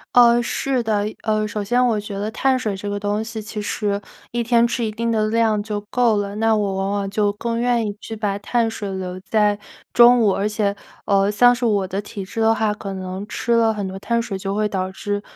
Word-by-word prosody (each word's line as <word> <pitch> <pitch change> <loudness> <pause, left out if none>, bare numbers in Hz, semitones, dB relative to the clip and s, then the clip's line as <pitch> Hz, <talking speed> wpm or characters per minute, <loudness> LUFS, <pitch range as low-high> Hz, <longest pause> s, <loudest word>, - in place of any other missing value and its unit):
呃， 240 0 +7
是 255 +1 -1
的， 215 -2 0 0.2
呃， 215 -1 +1
首 210 0 -3
先 245 +5 +2
我 220 -3 +1
觉 205 -1 -6
得 210 +2 -3
碳 260 +3 +2
水 215 -5 -2
这 205 +2 -5
个 205 - -2
东 205 +1 -1
西， 220 -1 -5
其 210 0 -6
实 205 -1 -2 0.3
一 240 0 -1
天 235 0 +3
吃 235 -1 -1
一 - - -1
定 230 +2 -2
的 215 -1 +1
量 220 -2 +2
就 205 -1 -4
够 240 -3 +3
了， 200 0 -2
那 225 0 +2
我 200 -2 0
往 195 +1 -1
往 200 -1 -1
就 205 0 +1
更 230 +2 -3
愿 240 -2 +1
意 205 - -3
去 225 - -7
把 205 -2 -2
碳 230 +1 0
水 205 -3 -5
留 185 -1 -5
在 210 +1 +1 0.3
中 240 0 +7
午。 205 - +4
而 195 +2 0
且， 210 -1 0 0.3
呃， 195 0 +3
像 245 +4 +5
是 245 0 -2
我 205 -4 +2
的 195 +2 -3
体 200 -1 -7
质 195 +4 -7
的 225 0 +4
话， 215 -1 +1
可 200 -2 -6
能 190 +2 -6
吃 235 - -3
了 225 -1 +4
很 205 -2 -3
多 190 +1 -7
碳 235 +3 0
水 200 -4 -4
就 195 +1 -3
会 210 0 +1
导 185 -1 -2
致 205 +1 -3
210 Hz, 260 characters per minute, -21 LUFS, 200-230 Hz, 0.3 s, 呃